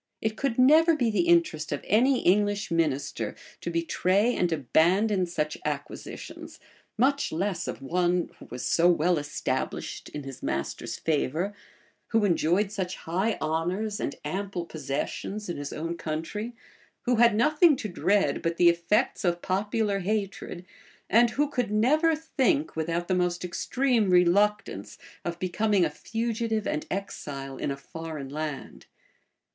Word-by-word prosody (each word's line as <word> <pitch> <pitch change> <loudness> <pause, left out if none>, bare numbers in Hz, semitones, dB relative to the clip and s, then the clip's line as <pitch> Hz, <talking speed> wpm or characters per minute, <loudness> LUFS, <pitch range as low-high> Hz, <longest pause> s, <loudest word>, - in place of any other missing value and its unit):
It 220 0 -1
could 265 -1 -1
never 315 +6 +6
be 245 -6 +1
the 180 -5 +1
interest 170 -2 +2
of 145 - -3
any 250 +6 +4
English 205 +1 +2
minister 155 -5 -1 0.2
to - - -4
betray 185 +7 +1
and 175 -1 +1
abandon 180 - +2
such 150 -3 -2
acquisitions; 145 -1 -6 0.4
much 275 +4 +2
less 180 +1 -2
of - - -5
one 175 +3 +1
who - - -11
was 125 0 -6
so 165 +9 +4
well 175 0 +3
established 145 0 -3
in 150 - -6
his 135 -1 -9
master's 70 +1 -3
favor, 160 +5 -1 0.5
who 225 -2 +2
enjoyed 180 +2 +2
such 190 -3 -3
high 190 +7 -1
honors 180 +7 -1
and - - -3
ample 185 +2 -3
possessions 160 +7 -4
in 175 - -3
his 145 0 -5
own 165 +2 -3
country, 170 +9 -4 0.5
who 245 -2 +2
had 235 -2 +5
nothing 300 +7 +5
to 230 - -4
dread 195 +2 +1
but 165 0 -1
the 175 -1 +7
effects 170 +9 +1
of 175 -1 0
popular 205 +2 0
hatred 195 -2 -3 0.5
and 235 +2 +6
who 290 +6 +1
could 250 -6 -1
never 300 +10 +3
think, 310 0 0
without 165 +2 -2
the 185 - +1
most 180 -1 0
extreme 240 +3 +1
reluctance, 180 - +2 0.3
of 170 -1 -3
becoming 190 +1 +1
a 155 - -2
fugitive 225 +4 -2
and 150 - -2
exile 140 -8 -5
in - - -2
a 140 - -3
foreign 155 -1 -7
land. 150 -1 -6
180 Hz, 145 wpm, -27 LUFS, 165-220 Hz, 0.5 s, the